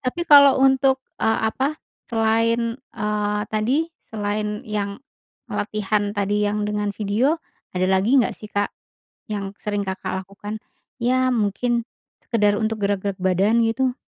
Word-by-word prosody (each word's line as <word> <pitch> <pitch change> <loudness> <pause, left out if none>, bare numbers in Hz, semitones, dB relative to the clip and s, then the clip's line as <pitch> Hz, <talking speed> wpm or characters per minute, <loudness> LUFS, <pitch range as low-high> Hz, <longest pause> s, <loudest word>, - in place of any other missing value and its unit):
Tapi 340 +7 -2
kalau 285 -3 +8
untuk, 265 0 +4 0.2
eee, 220 - +2
ap,a 275 +6 -1 0.3
selain, 230 0 +2 0.2
eee, 210 -3 -2
tadi, 245 +9 +1 0.2
selain 210 0 -3
yang 205 -2 -3 0.6
latihan 205 0 -1
tadi 205 +1 +1
yang 210 0 -1
dengan 210 0 -1
video, 220 +9 +1 0.4
ada 185 - +2
lagi 200 +8 +3
nggak 255 - +3
sih, 215 - -11
Kak, 205 0 -1 0.6
yang 200 -1 -4
sering 205 -1 -1
Kakak 190 -1 -4
lakukan? 205 +3 -8 0.4
Ya, 255 +2 +2
mungkin 235 +2 0 0.3
sekedar 210 -3 +2
untuk 220 0 0
gerak-gerak 200 -1 -1
badan, 190 +5 +2
gitu? 250 +3 0
215 Hz, 130 wpm, -22 LUFS, 205-240 Hz, 0.6 s, kalau